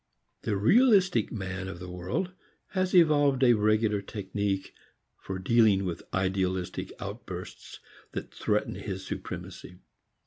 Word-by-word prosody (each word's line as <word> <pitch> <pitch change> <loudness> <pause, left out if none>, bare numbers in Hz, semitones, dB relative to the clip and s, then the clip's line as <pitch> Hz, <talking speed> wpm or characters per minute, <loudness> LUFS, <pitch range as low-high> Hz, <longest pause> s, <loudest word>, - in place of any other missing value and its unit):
The 105 - -1
realistic 190 - +4
man 95 -3 -4
of 95 -1 -6
the 90 +1 -8
world 90 - -3 0.4
has 185 -1 0
evolved 145 -5 +5
a 120 -2 +7
regular 105 -1 +2
technique 100 -1 -3 0.4
for 95 - -6
dealing 100 -1 +4
with 85 -2 -3
idealistic 95 -1 -1
outbursts - - -8 0.3
that - - -6
threaten - - 0
his 95 -1 -5
supremacy. 90 -1 -7
100 Hz, 115 wpm, -28 LUFS, 95-130 Hz, 0.4 s, a